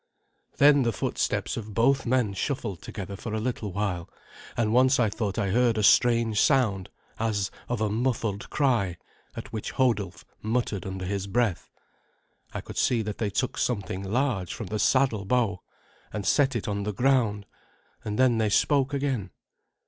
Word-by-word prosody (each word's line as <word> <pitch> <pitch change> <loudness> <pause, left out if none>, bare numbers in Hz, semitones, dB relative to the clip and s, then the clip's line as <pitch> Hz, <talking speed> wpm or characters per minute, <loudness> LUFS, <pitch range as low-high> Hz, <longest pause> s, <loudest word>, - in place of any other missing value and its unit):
Then 145 0 +6
the 120 -2 +1
footsteps 100 - -2
of 110 -3 -7
both 135 +4 +2
men 120 -5 +1
shuffled 100 - -3
together 100 -1 -7
for 110 +2 -5
a - - -1
little 110 -3 -3
while, 90 -3 -2 0.5
and 110 -2 +1
once 130 +2 +4
I 110 -4 +2
thought 105 -3 -3
I 100 -3 0
heard 120 +1 +3
a 105 - +1
strange 115 0 +4
sound 105 -9 +2 0.3
as 105 -4 -1 0.2
of 120 -3 -2
a 110 - +1
muffled 110 -3 -1
cry, 115 - +1 0.4
at 115 +1 -8
which 110 - -4
Hodulf 115 -9 0 0.2
muttered 110 -4 -1
under 95 -1 -5
his 100 +1 -3
breath. 110 -3 0 0.8
I - - -5
could - - -6
see 120 -3 +2
that 105 -1 -5
they 110 - 0
took 125 +6 -2
something 100 -5 -2
large 105 -3 -1
from 115 - -6
the 105 +3 -3
saddle 130 -6 +2
bow, 105 -3 0 0.5
and 105 -2 -4
set 135 +2 +3
it 115 - -2
on 100 -1 -2
the 105 +1 -3
ground, 115 -4 +1 0.6
and 105 -1 -3
then 125 -3 +3
they 110 -1 +2
spoke 140 +6 +2
again. 135 -9 -1
110 Hz, 170 wpm, -26 LUFS, 100-125 Hz, 0.8 s, Then